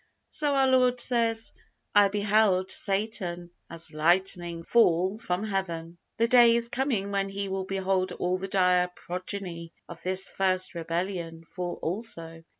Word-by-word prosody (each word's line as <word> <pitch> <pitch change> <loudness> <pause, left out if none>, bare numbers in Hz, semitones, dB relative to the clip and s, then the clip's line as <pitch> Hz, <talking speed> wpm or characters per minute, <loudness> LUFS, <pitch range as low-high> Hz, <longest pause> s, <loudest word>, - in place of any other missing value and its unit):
So 290 -2 0
our 270 -1 +4
Lord 255 -1 +3
says, 230 -2 +2 0.4
"I 205 -1 +6
beheld 205 -2 +2
Satan 195 -4 -2 0.2
as 165 -1 -6
lightning 175 +1 +1
fall 190 -1 +2
from 180 -3 -2
Heaven." 175 -5 -3 0.2
The 230 0 +2
day 235 -1 +6
is 235 0 0
coming 235 -7 -1
when 195 0 -1
He 195 0 -4
will 190 0 -3
behold 190 -1 -1
all 180 +1 -1
the 195 - -4
dire 180 -2 +3
progeny 180 -2 -6
of - - -10
this 190 +1 0
first 185 -1 0
rebellion 170 0 -4
fall 180 0 -5
also. 165 -4 -5
190 Hz, 145 wpm, -27 LUFS, 175-215 Hz, 0.4 s, I